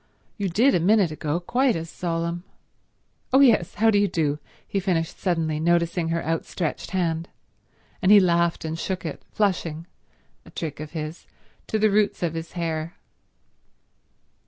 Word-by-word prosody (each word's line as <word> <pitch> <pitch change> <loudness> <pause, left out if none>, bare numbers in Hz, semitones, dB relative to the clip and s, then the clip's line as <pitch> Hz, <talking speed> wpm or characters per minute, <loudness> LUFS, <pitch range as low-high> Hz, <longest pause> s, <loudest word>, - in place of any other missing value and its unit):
You 200 -3 -2
did 240 +10 +4
a - - +3
minute 195 0 +3
ago, 155 +1 -2
quite 245 +7 +1
as 165 0 -4
solemn. 170 0 -3 0.9
Oh 265 - +6
yes—how 225 -3 +4
do 205 - +4
you 205 - +3
do," 150 -5 0 0.3
he 200 - -1
finished 175 -4 -1
suddenly, 165 -4 0
noticing 170 +1 +1
her 165 0 -1
outstretched 165 0 -2
hand. 170 -3 -1 0.7
And 190 - +4
he 210 - +10
laughed 170 -3 +2
and 160 +1 -3
shook 185 -1 -3
it, 155 - -5
flushing—a 175 -5 -4
trick 155 -4 -5
of 155 +1 -7
his—to 160 +6 -7
the 215 0 +3
roots 205 -2 +1
of 170 -2 0
his 165 0 -6
hair. 165 -1 -3
170 Hz, 145 wpm, -24 LUFS, 165-195 Hz, 0.9 s, he